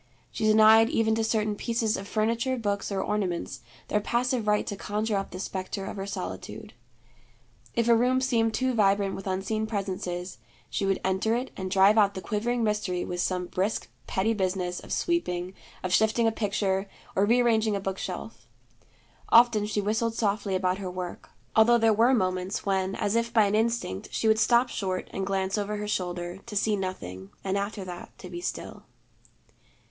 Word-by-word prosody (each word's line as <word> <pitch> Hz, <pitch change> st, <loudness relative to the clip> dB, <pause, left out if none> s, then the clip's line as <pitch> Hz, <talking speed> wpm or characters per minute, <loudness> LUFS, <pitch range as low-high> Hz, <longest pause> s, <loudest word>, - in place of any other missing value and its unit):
She 220 Hz, -, -2 dB
denied 220 Hz, +1 st, +7 dB
even 225 Hz, -6 st, +2 dB
to 225 Hz, 0 st, +1 dB
certain 215 Hz, -1 st, 0 dB
pieces 230 Hz, 0 st, 0 dB
of 195 Hz, -, -6 dB
furniture, 230 Hz, +5 st, 0 dB
books, 205 Hz, -3 st, -2 dB
or 195 Hz, -1 st, -1 dB
ornaments, 190 Hz, -5 st, -2 dB, 0.3 s
their 210 Hz, -, +1 dB
passive 240 Hz, +1 st, 0 dB
right 210 Hz, 0 st, +2 dB
to 205 Hz, -, -4 dB
conjure 210 Hz, +2 st, -2 dB
up 195 Hz, 0 st, -2 dB
the 185 Hz, -, -8 dB
spectre 190 Hz, +1 st, -4 dB
of -, -, -6 dB
her 195 Hz, 0 st, -4 dB
solitude. 200 Hz, -, -6 dB, 1.0 s
If 235 Hz, 0 st, +1 dB
a 235 Hz, -, +6 dB
room 250 Hz, +3 st, +3 dB
seemed 230 Hz, -3 st, +2 dB
too 260 Hz, 0 st, +1 dB
vibrant 200 Hz, -3 st, +2 dB
with 195 Hz, -, -6 dB
unseen 200 Hz, +4 st, -1 dB
presences, 185 Hz, -3 st, -4 dB, 0.3 s
she 195 Hz, -, -1 dB
would 195 Hz, -1 st, +1 dB
enter 190 Hz, +4 st, +1 dB
it 250 Hz, +2 st, -3 dB
and 190 Hz, -1 st, -4 dB
drive 195 Hz, +3 st, +5 dB
out 200 Hz, -1 st, +3 dB
the 190 Hz, -, -4 dB
quivering 235 Hz, +3 st, -1 dB
mystery 210 Hz, -4 st, -1 dB
with 175 Hz, 0 st, -3 dB
some 180 Hz, -1 st, -1 dB
brisk 190 Hz, +4 st, -2 dB, 0.2 s
petty 205 Hz, +4 st, +1 dB
business 185 Hz, -3 st, -1 dB
of -, -, -12 dB
sweeping, 185 Hz, -, -1 dB, 0.3 s
of 185 Hz, -1 st, -1 dB
shifting 220 Hz, +3 st, +3 dB
a 225 Hz, -, +4 dB
picture, 200 Hz, -2 st, -1 dB, 0.3 s
or 195 Hz, -, +3 dB
rearranging 225 Hz, -2 st, +3 dB
a -, -, -1 dB
book 195 Hz, 0 st, -4 dB
shelf. -, -, -6 dB, 0.8 s
Often 230 Hz, -3 st, +5 dB
she 210 Hz, -1 st, -1 dB
whistled 225 Hz, +3 st, 0 dB
softly 200 Hz, -3 st, 0 dB
about 185 Hz, 0 st, 0 dB
her 190 Hz, -2 st, -4 dB
work, 180 Hz, -1 st, -6 dB, 0.3 s
although 230 Hz, +2 st, +6 dB
there 225 Hz, -1 st, +4 dB
were 235 Hz, +5 st, +4 dB
moments 185 Hz, -2 st, -1 dB
when 190 Hz, -1 st, 0 dB
as 205 Hz, +2 st, -1 dB
if 230 Hz, 0 st, +1 dB
by 225 Hz, -2 st, +5 dB
an 200 Hz, -, 0 dB
instinct 225 Hz, -, -1 dB
she 225 Hz, -, 0 dB
would 220 Hz, 0 st, +4 dB
stop 240 Hz, +1 st, +4 dB
short 190 Hz, -6 st, -3 dB
and 190 Hz, 0 st, -3 dB
glance 195 Hz, +1 st, 0 dB
over 210 Hz, +1 st, -2 dB
her 210 Hz, 0 st, -4 dB
shoulder, 175 Hz, -2 st, -3 dB
to 220 Hz, -, -7 dB
see 210 Hz, +1 st, +2 dB
nothing, 95 Hz, -, -5 dB
and 190 Hz, 0 st, -1 dB
after 200 Hz, 0 st, -3 dB
that 175 Hz, -1 st, -9 dB
to 180 Hz, -, -10 dB
be 175 Hz, 0 st, -6 dB
still. -, -, -5 dB
205 Hz, 185 wpm, -27 LUFS, 190-225 Hz, 1.0 s, denied